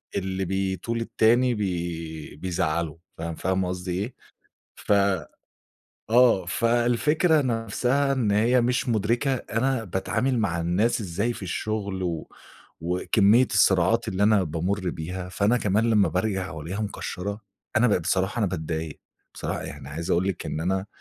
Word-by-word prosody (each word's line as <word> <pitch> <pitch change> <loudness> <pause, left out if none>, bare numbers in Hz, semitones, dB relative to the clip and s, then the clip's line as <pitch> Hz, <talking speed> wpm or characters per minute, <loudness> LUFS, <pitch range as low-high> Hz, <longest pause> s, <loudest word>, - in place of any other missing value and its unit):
اللي 95 0 -2
بيطول 95 +5 -2
التاني 120 +2 +3
بي 85 -6 -4
بيزعّله 85 -2 -2 0.2
فاهم 80 0 -4
فاهمة 95 +1 0
قصدي 90 0 -4
إيه؟ 100 +8 -3 0.6
ف - - -5 1.2
آه. 115 -7 +5
فالفكرة 120 - +2
نَفسها 125 +4 0
إن 125 -6 +1
هي 115 +5 +3
مش 125 +2 0
مُدرِكة 120 +5 +1
أنا 125 +1 -1
باتعامل 115 +7 -1
مع 85 -7 0
الناس 95 +9 +1
إزاي 100 +4 -1
في 110 - -10
الشُغل 100 +1 -3
و 85 -3 -3 0.5
وكمية 100 +7 +3
الصراعات 95 +5 +3
اللي 100 -1 -1
أنا 105 -2 +5
بامُر 90 +4 -1
بيها، 90 +3 -5
فأنا 100 +5 +2
كمان 105 +2 +1
لمّا 105 -3 +4
بارجع 95 0 -1
وألاقيها 80 +6 -5
مكشَّرة، 100 0 -4 0.4
أنا 115 +2 +5
بقيت 100 - +2
بصراحة 95 +6 0
أنا 110 - +2
باتضايق، 80 -3 -4 0.3
بصراحة - - -4
يعني 65 - -8
عايز 80 +4 -5
أقول 90 +3 +2
لِك 95 - -3
إن 75 - -3
أنا 95 +3 -1
100 Hz, 140 wpm, -25 LUFS, 90-115 Hz, 1.2 s, آه